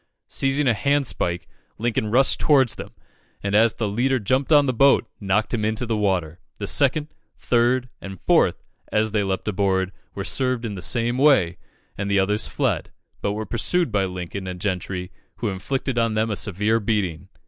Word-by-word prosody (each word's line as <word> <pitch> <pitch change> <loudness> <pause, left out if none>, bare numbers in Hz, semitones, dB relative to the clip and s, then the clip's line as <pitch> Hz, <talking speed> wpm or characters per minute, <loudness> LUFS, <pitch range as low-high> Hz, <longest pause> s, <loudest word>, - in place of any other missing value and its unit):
Seizing 135 +1 0
a 120 - +4
hand 140 +6 +1
spike, 85 -7 -2 0.3
Lincoln 110 -2 -1
rushed 130 +5 +3
towards 135 -6 +4
them, - - -7 0.5
and 100 0 -2
as 110 +1 +4
the 110 - -2
leader 125 +6 +1
jumped 130 +7 0
on 145 -2 +6
the 130 - 0
boat, 135 0 +4
knocked 105 +3 0
him 110 -3 0
into 110 +3 -1
the 115 -1 -1
water. 95 -5 -1 0.2
The 100 - -4
second, 145 +6 +2 0.3
third, 125 +1 +1
and 95 -2 -8
fourth, - - +2 0.3
as 110 0 +1
they 105 -1 +1
leaped 95 0 -3
aboard, 95 -2 0 0.2
were 100 - -3
served 130 +1 -1
in 110 - -3
the 95 - -7
same 120 +3 0
way, 110 - +4 0.4
and 100 0 -2
the 100 - +2
others 105 +2 +1
fled, - - -1 0.3
but 100 - -1
were 110 +1 -4
pursued 165 - 0
by 100 -2 +1
Lincoln 90 +1 -5
and 90 -1 -5
Gentry, 90 -1 -3 0.2
who 115 - -2
inflicted 125 +6 -2
on 115 -1 +1
them 110 +1 +1
a - - -1
severe 105 +4 +1
beating. 100 -7 -2
110 Hz, 185 wpm, -23 LUFS, 95-125 Hz, 0.5 s, on